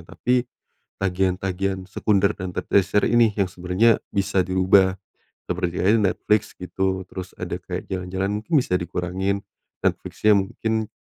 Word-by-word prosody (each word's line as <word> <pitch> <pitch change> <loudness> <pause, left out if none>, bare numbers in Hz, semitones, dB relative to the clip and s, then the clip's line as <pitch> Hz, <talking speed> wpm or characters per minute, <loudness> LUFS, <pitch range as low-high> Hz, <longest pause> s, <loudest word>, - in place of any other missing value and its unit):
tapi, 125 +7 0 0.6
tagihan-tagihan 95 0 -1
sekunder 100 0 +2
dan 95 -1 -5
te - - -1
tersier 100 +1 +2
ini 120 -2 +4
yang 100 -3 +1
sebenernya 90 +6 +2 0.2
bisa 100 -1 +1
dirubah, 95 +1 +3 0.5
seperti 90 -1 -1
ada 105 +5 +4
Netflix 105 -1 0
gitu 95 +1 -2
terus 95 -1 -7
ada - - -3
kayak - - -6
jalan-jalan 95 +1 -2
mungkin 140 +10 -4
bisa 90 - 0
dikurangin, 90 +3 -2 0.4
Netflix-nya 105 -1 +2
mungkin 110 +2 -2
95 Hz, 130 wpm, -23 LUFS, 90-105 Hz, 0.6 s, ini